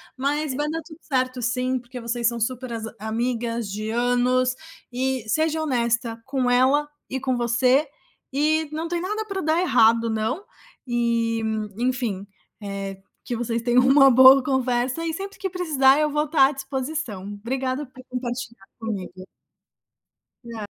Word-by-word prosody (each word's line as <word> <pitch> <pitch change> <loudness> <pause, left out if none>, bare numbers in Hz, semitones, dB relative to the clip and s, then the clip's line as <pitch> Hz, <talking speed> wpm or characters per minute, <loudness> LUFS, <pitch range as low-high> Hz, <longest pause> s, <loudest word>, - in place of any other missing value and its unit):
mas 280 +1 -1
vai 295 +2 -1
dar 325 +1 -3
tudo 315 0 -13
certo, 255 -2 -1
sim, 250 +2 0
porque 250 +1 -8
vocês 235 0 -3
são 235 0 +2
super 255 +2 -3
as 225 -1 -4
amigas 230 +1 -2
de 215 +2 -4
anos. 245 +2 +2 0.4
E 260 -2 -1
seja 315 +6 +1
honesta 235 -4 -1
com 265 -2 0
ela 260 +4 +3 0.2
e 265 - -2
com 260 -1 -1
você, 250 +4 +3 0.5
e 305 +3 +1
não 320 +2 -3
tem 345 0 -2
nada 425 +4 -3
para 395 -2 -4
dar 315 +1 +1
errado, 230 -9 +4
não. 220 - -2 0.4
Eh, 235 -1 0 0.4
enfim, 240 -6 -1 0.4
eh, 195 -1 -5 0.3
que 245 - -3
vocês 230 0 -2
tenham 245 +1 +3
uma 275 +1 +7
boa 260 +2 +8
conversa 255 +2 0
e, 330 - -1
sempre 390 +4 -6
que 385 - -3
precisar, 300 -7 +3
eu 305 0 +2
vou 300 +1 0
estar 290 -3 +5
à - - -2
disposição. 270 - -4
Obrigado 255 +7 -3
por 255 0 -14
compartilhar 245 -4 -5
comigo. 190 -4 -5 1.2
Na 230 -3 -6
255 Hz, 155 wpm, -24 LUFS, 235-290 Hz, 1.2 s, boa